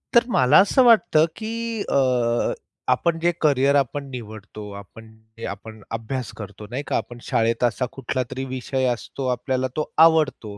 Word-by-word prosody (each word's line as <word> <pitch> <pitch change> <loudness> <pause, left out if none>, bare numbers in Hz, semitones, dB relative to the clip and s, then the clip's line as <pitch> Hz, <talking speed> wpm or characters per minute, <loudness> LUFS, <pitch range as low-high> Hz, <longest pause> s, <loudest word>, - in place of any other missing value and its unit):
तर 235 - +7
मला 130 - +5
असं 205 +7 +4
वाटतं 220 -10 +5
की 220 0 -5 0.4
अ, 125 -3 +1 0.4
आपण 165 +6 +1
जे 170 +1 +2
करियर 140 -2 +3
आपण 140 +1 0
निवडतो, 110 -3 -9
आपण 100 +3 -12 0.3
जे 115 - -6
आपण 110 +2 -8 0.2
अभ्यास 125 +2 -5
करतो, 105 0 -9
नाही 130 +5 -4
का, - - +1
आपण 120 - -6
शाळेत 115 +1 0
असा 120 +1 +1
कुठलातरी 130 0 -4
विषय 130 0 -2
असतो 130 +3 -6
आपल्याला 130 +1 -1
तो 155 - -1 0.2
आवडतो, 150 -10 +1
130 Hz, 155 wpm, -23 LUFS, 115-140 Hz, 0.4 s, तर